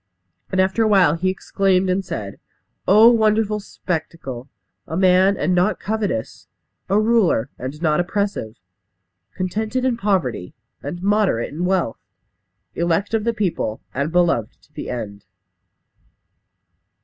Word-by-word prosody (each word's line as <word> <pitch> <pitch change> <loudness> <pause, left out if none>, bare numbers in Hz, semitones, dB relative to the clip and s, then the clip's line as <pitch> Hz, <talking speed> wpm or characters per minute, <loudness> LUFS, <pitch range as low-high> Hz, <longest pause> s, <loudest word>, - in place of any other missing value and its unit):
And 190 - 0
after 190 +4 +2
a 220 - +4
while 190 -7 +5
he 175 +3 0
exclaimed, 190 0 +1
and 185 +1 0
said: 110 - -6 0.5
"Oh, 215 +4 +7
wonderful 215 -2 +2
spectacle! 160 - -5 0.4
A 160 - -3
man, 185 +1 +4
and 170 +5 0
not 180 +4 +2
covetous. 205 - -3 0.4
A 200 +2 +3
ruler, 215 - +2
and 130 +4 -6
not 155 -1 +2
oppressive. 180 - -2 0.8
Contented 220 +7 -2
in 250 -3 +1
poverty, 185 - -1 0.3
and 175 +6 -6
moderate 200 - +1
in 170 +4 -2
wealth. 180 -10 0 0.7
Elect 170 +5 0
of 220 -1 0
the 235 - +1
people, 175 - -2
and 140 +4 -2
beloved 170 -10 +1
to 150 - -27
the - - -6
end!" 105 -5 -6
185 Hz, 130 wpm, -21 LUFS, 150-205 Hz, 0.8 s, Oh